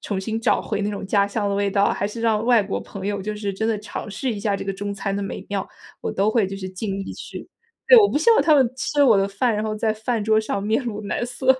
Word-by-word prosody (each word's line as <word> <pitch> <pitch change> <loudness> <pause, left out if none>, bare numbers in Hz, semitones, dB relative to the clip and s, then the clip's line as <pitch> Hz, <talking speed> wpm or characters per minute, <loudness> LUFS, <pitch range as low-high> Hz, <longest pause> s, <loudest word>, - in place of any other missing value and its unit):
重 200 -3 -3
新 220 +3 -3
找 - - +2
回 210 -2 -3
那 205 - -1
种 200 -1 -5
家 200 0 +2
乡 205 0 -1
的 200 - 0
味 200 0 0
道， 200 0 +2
还 200 - -2
是 230 +2 -7
让 220 -1 +1
外 240 -2 +5
国 195 -1 -3
朋 200 -1 -7
友 205 -1 -2
就 210 +1 -4
是 205 -1 -3
真 220 +4 -2
的 220 - 0
尝 210 0 -7
试 245 +5 -2
一 205 - -6
下 200 -1 0
这 - - -6
个 195 - -2
中 200 +1 -4
餐 195 0 -3
的 200 - -2
美 195 - -6
妙， 200 -1 -2 0.3
我 - - -3
都 200 +2 +1
会 220 -1 +2
就 195 +1 -6
是 190 -1 -6
尽 195 +1 -4
力 195 - -5
去 - - -9 0.4
对， - - +8
我 410 - +6
不 - - -2
希 460 +9 +4
望 - - +5
他 305 0 +5
们 270 -3 +5
吃 290 +2 +1
我 235 - +6
的 195 0 +2
饭， 220 +3 0
然 210 - -1
后 215 -1 -2
在 220 0 +1
饭 220 +1 -2
桌 220 0 +3
上 200 -2 -3
面 220 +6 +1
露 215 -2 -4
难 205 +3 -2
色。 250 +2 -6
210 Hz, 320 characters per minute, -22 LUFS, 200-225 Hz, 0.4 s, 对